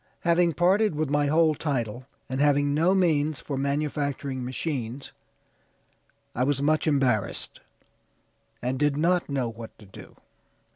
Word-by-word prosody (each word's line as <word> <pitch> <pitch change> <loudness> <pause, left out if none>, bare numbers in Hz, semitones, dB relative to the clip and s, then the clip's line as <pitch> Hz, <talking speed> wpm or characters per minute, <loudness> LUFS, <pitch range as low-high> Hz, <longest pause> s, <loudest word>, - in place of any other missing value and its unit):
Having 170 0 +3
parted 185 +3 +2
with 150 -2 -1
my 145 0 +2
whole 155 +1 +4
title, 130 -5 -3 0.2
and 130 +1 -2
having 145 -1 +3
no 170 +6 +3
means 155 -5 +1
for 140 - -5
manufacturing 140 -1 -2
machines, 130 -1 -4 1.2
I 125 - 0
was 140 +1 +1
much 155 +3 +1
embarrassed, 130 -9 0 1.0
and 130 +1 -1
did 145 -1 +1
not 175 +2 +1
know 135 -3 -1
what 115 0 -11
to 105 - -15
do." 95 - -13
145 Hz, 135 wpm, -26 LUFS, 130-155 Hz, 1.2 s, whole